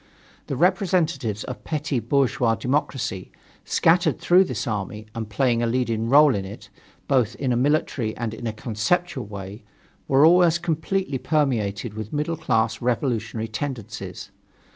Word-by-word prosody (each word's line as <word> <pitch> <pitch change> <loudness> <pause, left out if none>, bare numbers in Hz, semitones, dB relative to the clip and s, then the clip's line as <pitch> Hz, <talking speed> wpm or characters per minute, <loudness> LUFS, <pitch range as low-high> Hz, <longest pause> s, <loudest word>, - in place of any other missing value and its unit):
The 140 - -2
representatives 165 - +1
of - - -7
petty 150 -4 -2
bourgeois 120 -1 +1
democracy, 130 -7 -2 0.3
scattered 165 -2 +3
through 185 +2 +5
this 125 - -4
army 105 0 -4
and 110 -2 -5
playing 120 +2 +1
a 120 - +1
leading 115 -2 -1
role 145 +1 +6
in 100 - -2
it, 100 +1 -10 0.4
both 125 -5 +2
in 130 -3 -1
a - - +1
military 130 -4 0
and 115 -2 -3
in 115 +1 -5
a - - -1
conceptual 120 - -1
way, 100 +1 -8 0.4
were 135 +2 +5
almost 175 0 +5
completely 160 -2 -1
permeated 120 -9 0
with 110 0 -7
middle 150 +3 -1
class 125 -8 0
revolutionary 115 -2 -1
tendencies. 110 - -6
125 Hz, 140 wpm, -23 LUFS, 110-150 Hz, 0.4 s, role